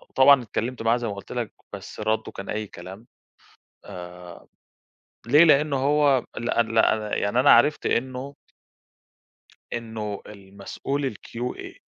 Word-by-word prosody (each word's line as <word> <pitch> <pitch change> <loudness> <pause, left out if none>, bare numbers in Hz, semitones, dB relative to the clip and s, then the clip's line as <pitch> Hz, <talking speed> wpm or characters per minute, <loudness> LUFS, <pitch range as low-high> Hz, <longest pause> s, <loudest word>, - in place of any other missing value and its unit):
طبعًا 135 -1 +6
اتكلمت 120 +2 -4
معاه- 115 +1 +2
زي 120 -1 -4
ما 105 - -3
قُلت 100 - -11
لَك- 120 -4 -3 0.2
بس - - -9
رده 110 0 -1
كان 100 - -9
أي 105 0 -3
كلام، 95 +5 -11 0.8
آآ 90 0 -10 0.8
ليه، 145 +7 +7
لأنه 150 -2 +4
هو 140 -1 +3
لأ، 120 0 +1
لأ، 110 -1 +1
يعني 100 +5 +1
أنا 135 - +5
عرفت 145 +1 +4
إنه 130 +3 -2 1.4
إنه 110 -3 -5
المسؤول 105 +7 -5
الQA 120 +4 -7
115 Hz, 125 wpm, -24 LUFS, 105-135 Hz, 1.4 s, ليه